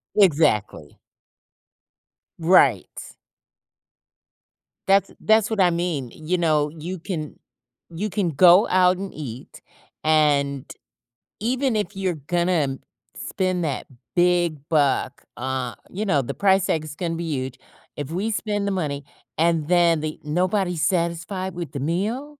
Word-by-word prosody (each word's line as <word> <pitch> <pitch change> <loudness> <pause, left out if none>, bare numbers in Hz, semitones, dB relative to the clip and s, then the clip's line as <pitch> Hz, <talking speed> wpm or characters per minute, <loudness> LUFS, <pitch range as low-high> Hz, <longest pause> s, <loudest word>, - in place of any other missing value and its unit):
Exactly. 145 - +2 1.4
Right. 160 - +2 1.7
That's 195 0 +3
that's 220 -1 +3
what 220 -3 -2
I 180 - +5
mean, 170 -8 -2
you 165 +4 -2
know, 155 -3 +2
you 165 +4 -7
can 160 -4 -5 0.5
you 190 +6 -4
can 190 -3 -1
go 180 +7 +6
out 185 0 +4
and 195 +1 -6
eat, 130 -5 -9 0.4
and 145 -3 +2 0.7
even 250 +2 0
if 210 -1 -2
you're 190 -3 -1
gonna 160 -2 0 0.4
spend 185 -2 -2
that 145 -5 -3 0.3
big 175 -3 +2
buck, 140 -3 +1
uh, 130 -2 -3
you 205 +4 -4
know, 150 -9 +2
the 120 - -5
price 195 -1 +3
tag 155 - 0
is 150 -1 -8
gonna 165 -1 -3
be 170 - -4
huge. 130 -3 -4 0.4
If 145 0 -6
we 200 +6 -1
spend 205 -1 -2
the 200 - 0
money, 145 -7 -3 0.3
and 165 -2 +1
then 170 -2 +3
the 155 0 -5
nobody's 180 +1 0
satisfied 185 +2 -2
with 170 -5 -5
the 140 - -4
meal? 210 - -2
170 Hz, 130 wpm, -23 LUFS, 150-190 Hz, 1.7 s, go